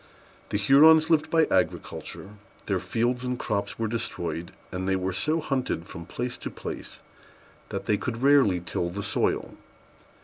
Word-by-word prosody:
The - - 0
Hurons 155 +9 +6
lived 155 -2 +3
by 160 -1 +4
agriculture: 95 +1 -2 0.4
their - - 0
fields 120 +2 -1
and 125 0 -2
crops 100 -4 -2
were 115 - -1
destroyed, 85 -6 -3 0.2
and 95 0 -3
they 95 - +3
were 95 0 -1
so 155 - +1
hunted 130 - -2
from 85 -1 -9
place 120 0 -4
to - - -5
place - - -7 0.7
that - - -4
they 105 - +2
could 115 +3 -4
rarely 130 -11 +5
till 85 0 -2
the 100 +4 -5
soil. - - 0
115 Hz, 160 wpm, -26 LUFS, 95-135 Hz, 0.7 s, Hurons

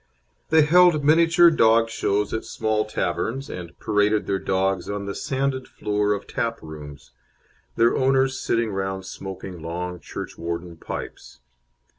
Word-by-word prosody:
They 160 -1 +6
held 170 -1 +5
miniature 165 +2 +6
dog 115 -5 +4
shows 105 -2 0
at 110 - -2
small 110 -1 -1
taverns, 110 - -2
and 85 -1 -8
paraded 105 0 +1
their 95 -1 -1
dogs 95 -1 0
on 100 0 -3
the 100 - -4
sanded 135 -1 -2
floor 105 0 0
of 100 - -5
tap 115 0 -2
rooms, 75 -3 -10 0.6
their 115 +1 +3
owners 130 0 +2
sitting 115 -1 0
around 95 -1 -3
smoking 95 -2 -8
long 90 +2 -4
church - - -8
warden 85 0 -5
pipes. 65 - -8
105 Hz, 140 wpm, -23 LUFS, 95-130 Hz, 0.6 s, They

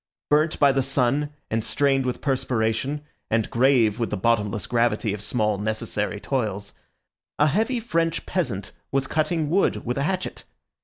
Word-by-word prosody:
Burnt 155 +2 +3
by 140 -2 +6
the 135 0 +1
sun 135 +2 +1 0.2
and 110 0 0
stained 135 +1 +1
with 125 - -3
perspiration, 130 +1 0 0.3
and 110 -1 0
grave 120 -3 +3
with 115 - 0
the 105 - -2
bottomless 105 -1 +1
gravity 115 -3 +1
of 105 - -5
small 105 -1 0
necessary 105 -1 -2
toils, 105 -6 -2 0.6
a 150 - +4
heavy 220 - +1
French 165 -7 -1
peasant 120 - -2 0.2
was 135 0 +1
cutting 155 +2 0
wood 185 +6 +1
with 125 +3 -1
a - - +1
hatchet. 185 +4 -2
125 Hz, 155 wpm, -24 LUFS, 110-150 Hz, 0.6 s, by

